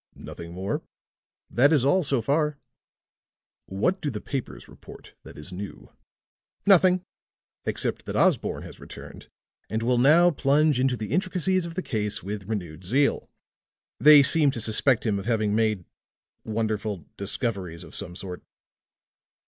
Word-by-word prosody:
"Nothing 85 0 -9
more?" 95 +3 -3 0.7
"That 140 +5 +4
is 145 -5 +3
all, 185 +7 +4
so 135 -7 0
far." 150 0 +1 1.1
"What 140 - -1
do 150 - -1
the 105 - -5
papers 110 - -6
report - - -14
that - - -13
is 75 +5 -9
new?" 100 +2 -8 0.7
"Nothing, 185 -2 +5 0.6
except - - -2
that - - -4
Osborne - - +1
has - - -11
returned - - -11 0.4
and 110 +1 -2
will 125 +1 +2
now 165 +7 +6
plunge 145 -1 +2
into 130 -1 +1
the 110 -2 -6
intricacies 185 -1 0
of 165 - -9
the 185 - -3
case 105 -4 -2
with 100 +1 -5
renewed 90 -6 -5
zeal. 135 +10 +1 0.7
They 150 -1 +8
seem 150 +1 +3
to 125 - -3
suspect 115 +3 +2
him 105 -3 +1
of 100 - -8
having 110 -3 +1
made 110 -5 0 0.6
wonderful 110 -3 -3
discoveries 95 -4 -3
of 80 - -13
some 90 -3 -7
sort." 90 -1 -7
115 Hz, 145 wpm, -25 LUFS, 100-150 Hz, 1.1 s, They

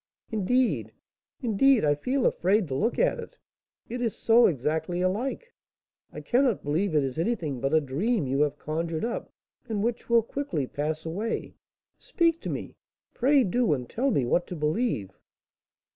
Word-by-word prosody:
Indeed, 235 +4 +1 0.5
indeed, 240 - +4
I 145 - +4
feel 250 - -1
afraid 195 +2 +2
to - - -3
look 220 - 0
at - - +2
it, - - -9 0.5
it 245 +1 -5
is 230 -3 -1
so 235 +1 +5
exactly 160 +4 -1
alike. 245 - -2 0.6
I - - -8
cannot 250 -3 +1
believe 160 +5 0
it 150 - +4
is 135 +3 -3
anything 165 - -1
but 135 +1 0
a 160 - +5
dream 155 - -1
you 135 +2 0
have 150 -1 +1
conjured 160 +3 -3
up, 240 - -4 0.4
and 210 -2 -1
which 235 +1 -2
will 235 -1 +5
quickly 225 - -3
pass 155 +4 -3
away. 200 +8 -3 0.5
Speak 335 -1 +1
to - - -4
me! - - -5 0.4
pray 270 +2 +4
do; 230 -1 +2
and 125 -4 -3
tell 265 +4 0
me 140 - +1
what 175 +8 +1
to 180 - -6
believe." 150 - -1
195 Hz, 165 wpm, -27 LUFS, 150-240 Hz, 0.6 s, so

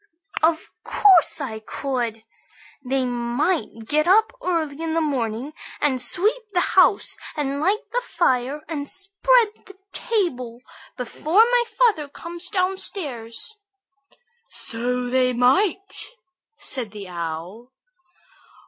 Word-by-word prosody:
"Of 320 0 +1
course 375 -6 +5
I 225 -6 -4
could. 235 -1 -3 0.6
They 260 0 0
might 240 - -1
get 305 +6 +2
up 435 +4 +5
early 320 -4 -1
in 325 -1 -2
the - - +3
morning 265 -3 -2 0.3
and 265 -4 +1
sweep 415 - 0
the 360 - +3
house, 380 +2 +4 0.2
and 280 -1 -1
light 410 +8 +1
the - - 0
fire, 275 - 0
and 290 -4 -3
spread 410 +4 +3 0.2
the 390 -2 -14 0.2
table 255 - -2 0.3
before 310 - +3
my 485 +1 +3
father 420 -12 +3
comes 345 +4 -6
downstairs." 365 - -3 0.9
"So 245 +2 -2
they 255 0 +2
might!" 355 - +2 0.5
said 245 -5 -3
the 205 -2 -9
Owl. 175 +7 -6
295 Hz, 110 wpm, -23 LUFS, 245-375 Hz, 0.9 s, course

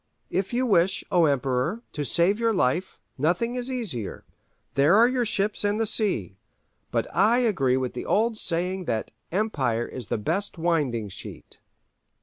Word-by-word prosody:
If 190 0 -1
you 250 +2 +1
wish, 190 -5 +2
O 175 -2 +5
Emperor, 140 - 0
to 150 - -2
save 175 - +3
your 230 -1 +2
life, 175 +1 0 0.2
nothing 180 - +1
is 250 +1 -3
easier: 185 - -4 0.5
there 145 +6 +4
are 230 +3 +7
your 250 -1 0
ships 205 0 0
and 205 +1 +1
the 225 - +2
sea. 185 - 0 0.5
But - - 0
I 230 +3 +4
agree 135 - +2
with 130 -1 -2
the 125 - -6
old 225 +2 +2
saying 180 -1 -2
that 115 -5 -2 0.2
'Empire 140 - 0
is 125 -5 -7
the - - -1
best 175 - -2
winding 145 -11 0
sheet. 100 - -9
175 Hz, 160 wpm, -25 LUFS, 130-215 Hz, 0.5 s, are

